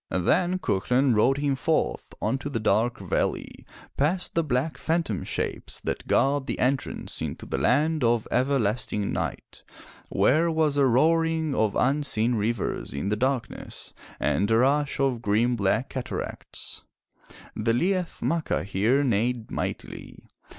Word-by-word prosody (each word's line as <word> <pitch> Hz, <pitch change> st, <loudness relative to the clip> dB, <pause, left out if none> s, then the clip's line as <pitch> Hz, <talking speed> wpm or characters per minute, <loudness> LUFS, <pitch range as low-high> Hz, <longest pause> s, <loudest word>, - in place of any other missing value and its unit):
Then 175 Hz, -, +2 dB
Cuchulain 125 Hz, -, +1 dB
rode 125 Hz, +6 st, +3 dB
him 140 Hz, -1 st, +1 dB
forth 130 Hz, -, 0 dB, 0.2 s
unto 130 Hz, +6 st, -1 dB
the 125 Hz, -5 st, -2 dB
Dark 115 Hz, +2 st, +1 dB
Valley, 95 Hz, -3 st, -2 dB, 0.3 s
past 170 Hz, +6 st, 0 dB
the 165 Hz, -, +2 dB
black 145 Hz, +2 st, -1 dB
phantom 160 Hz, -, -1 dB
shapes -, -, -3 dB
that -, -, -4 dB
guard 140 Hz, 0 st, +2 dB
the -, -, -2 dB
entrance 130 Hz, +1 st, -2 dB
into -, -, -4 dB
the -, -, -2 dB
land 155 Hz, +2 st, +2 dB
of 115 Hz, -1 st, +2 dB
everlasting 115 Hz, -5 st, 0 dB
night, -, -, -4 dB, 0.5 s
where 160 Hz, +5 st, +3 dB
was 160 Hz, -3 st, +1 dB
a 140 Hz, -2 st, +4 dB
roaring 160 Hz, +4 st, +2 dB
of 110 Hz, -5 st, +1 dB
unseen 135 Hz, -4 st, +1 dB
rivers 110 Hz, -, -2 dB
in 70 Hz, +8 st, -2 dB
the 105 Hz, -, +1 dB
dark 130 Hz, +1 st, 0 dB
ness, -, -, -8 dB, 0.3 s
and 100 Hz, -, +1 dB
a 115 Hz, -, +4 dB
rush 140 Hz, +4 st, +2 dB
of 135 Hz, -4 st, +1 dB
grim 115 Hz, +4 st, +2 dB
black 105 Hz, +5 st, 0 dB
cataracts. 130 Hz, -2 st, -6 dB, 0.7 s
The 110 Hz, +2 st, +1 dB
Liath 180 Hz, +7 st, 0 dB
Macha 165 Hz, -1 st, 0 dB
here 105 Hz, +9 st, +2 dB
neighed 120 Hz, -1 st, 0 dB
mightily. -, -, -5 dB
130 Hz, 140 wpm, -26 LUFS, 115-150 Hz, 0.7 s, a